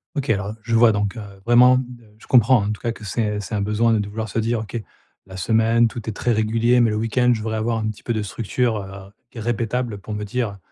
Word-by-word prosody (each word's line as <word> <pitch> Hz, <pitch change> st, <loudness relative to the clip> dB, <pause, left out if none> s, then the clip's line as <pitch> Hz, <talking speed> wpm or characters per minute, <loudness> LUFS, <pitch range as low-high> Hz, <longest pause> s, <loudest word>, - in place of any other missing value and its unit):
OK, 140 Hz, -2 st, -3 dB
alors, 100 Hz, -1 st, 0 dB
je 115 Hz, +1 st, -3 dB
vois 115 Hz, 0 st, +6 dB
donc, 105 Hz, 0 st, -1 dB
heu, 110 Hz, -, -5 dB, 0.2 s
vraiment, 125 Hz, +2 st, +6 dB
ne 130 Hz, -, -1 dB, 0.3 s
je -, -, -17 dB
comprends 120 Hz, -2 st, +5 dB
en 105 Hz, -, -1 dB
tout 105 Hz, -, -6 dB
cas 115 Hz, -, -1 dB
que 115 Hz, -, -11 dB
c'est, 105 Hz, 0 st, -1 dB
heu, -, -, -3 dB
c'est 105 Hz, +2 st, -7 dB
un 100 Hz, -, -1 dB
besoin 105 Hz, +3 st, +2 dB
de 110 Hz, -, +2 dB
de 105 Hz, -, -2 dB
vouloir 110 Hz, +1 st, -5 dB
se 115 Hz, -, -2 dB
dire: 115 Hz, +1 st, 0 dB
«OK, 110 Hz, +1 st, -5 dB, 0.5 s
la 95 Hz, 0 st, -9 dB
semaine 115 Hz, +4 st, +3 dB
tout 115 Hz, 0 st, -6 dB
est -, -, -4 dB
très 120 Hz, -, -1 dB
régulier, 115 Hz, +2 st, +2 dB
mais 120 Hz, -2 st, +4 dB
le 105 Hz, -, -1 dB
week-end, 115 Hz, +3 st, +1 dB
je 110 Hz, -, -5 dB
voudrais 110 Hz, 0 st, -2 dB
avoir 115 Hz, +1 st, -1 dB
un 110 Hz, -1 st, -2 dB
petit 110 Hz, -, -8 dB
peu 120 Hz, -, -1 dB
de 110 Hz, -, -1 dB
structure, 115 Hz, +3 st, -1 dB
heu, 95 Hz, -1 st, -9 dB, 0.2 s
gu 120 Hz, -, -9 dB
répétable, 115 Hz, -1 st, -2 dB
pour 105 Hz, +2 st, -7 dB
me 105 Hz, 0 st, -4 dB
dire 105 Hz, -1 st, -3 dB
110 Hz, 270 wpm, -21 LUFS, 105-120 Hz, 0.5 s, vois